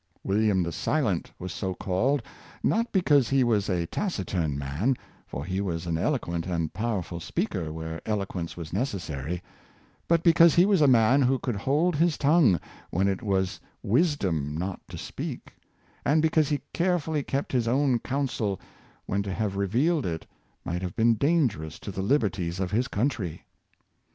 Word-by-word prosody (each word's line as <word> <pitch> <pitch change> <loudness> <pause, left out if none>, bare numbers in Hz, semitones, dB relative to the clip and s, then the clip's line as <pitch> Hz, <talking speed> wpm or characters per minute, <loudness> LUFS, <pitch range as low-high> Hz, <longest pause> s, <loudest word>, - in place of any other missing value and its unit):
William 100 -2 +2
the 85 - -3
Si - - 0
lent - - -1
was 90 -1 -6
so 95 -2 -3
called, 120 +12 0 0.4
not 230 +2 +1
because 145 - +3
he 135 -1 +3
was 105 -5 +1
a 90 -3 0
taciturn 90 - -2
man, 75 - 0 0.3
for 70 - -5
he 95 +2 -1
was 85 -4 -3
an 85 -1 -1
eloquent 85 +1 -1
and 85 -3 -2
powerful 95 -5 -2
speaker 80 -1 -2
where 80 +1 -5
eloquence 100 -6 -3
was 80 -3 -7
necessary, 90 - -3 0.6
but 165 0 +3
because 170 -1 +6
he 175 - +6
was 195 -4 +3
a 145 - +6
man 125 +2 +5
who 130 +1 +3
could 125 -3 -3
hold 150 - +1
his 165 0 +2
tongue 145 - +4 0.3
when 95 +3 +1
it 95 -1 -1
was 95 -4 0 0.2
wisdom 100 - +1
not 90 +2 -3
to - - -8
speak, - - -6 0.5
and 150 +3 +3
because 155 -2 +3
he 145 -2 0
carefully 170 -4 +1
kept 140 +1 -2
his 120 -3 +1
own 130 0 +2
counsel 120 -8 -2 0.5
when 100 - 0
to 100 -1 -4
have 100 0 -2
revealed 125 - +1
it 80 -1 -4 0.4
might 90 +1 -2
have 90 -2 -4
been 115 +1 +4
dangerous 115 - +1
to 100 - -7
the 95 - -4
liberties 95 - 0
of 95 -1 -2
his 120 +4 +1
country. 100 - -2
105 Hz, 165 wpm, -27 LUFS, 90-140 Hz, 0.6 s, because